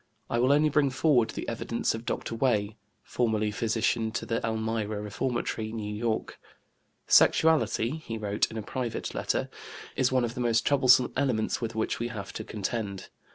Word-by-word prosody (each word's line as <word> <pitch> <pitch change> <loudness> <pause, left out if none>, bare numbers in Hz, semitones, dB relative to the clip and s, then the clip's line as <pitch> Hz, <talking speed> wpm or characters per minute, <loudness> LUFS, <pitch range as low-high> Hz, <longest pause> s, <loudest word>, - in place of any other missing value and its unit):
I 120 - +1
will 125 +3 +4
only 150 +2 +4
bring 145 -1 +3
forward 130 -3 +3
the - - -5
evidence 115 0 -1
of 115 +1 -7
Dr. - - -3
Wey, 110 -3 +1 0.3
formerly 110 -3 0
physician 110 0 0
to - - -3
the 115 - -2
Elmira 110 -1 -2
Reformatory, 110 +1 -3
New 105 -2 -4
York. 110 +1 -2 0.7
"Sexuality" 160 -4 +4
(he 115 -8 -6
wrote 105 -1 0
in 110 - -7
a 110 - -4
private 120 +1 -4
letter) - - -1 0.5
"is 130 -1 +2
one 130 -2 +2
of 115 - -4
the 125 - -4
most 115 -2 +2
troublesome 130 -3 +5
elements 125 -6 0
with 115 -1 -3
which 110 - -1
we 120 - -1
have 100 -4 -7
to 110 - -5
contend. 105 -2 -4
115 Hz, 170 wpm, -28 LUFS, 110-125 Hz, 0.7 s, troublesome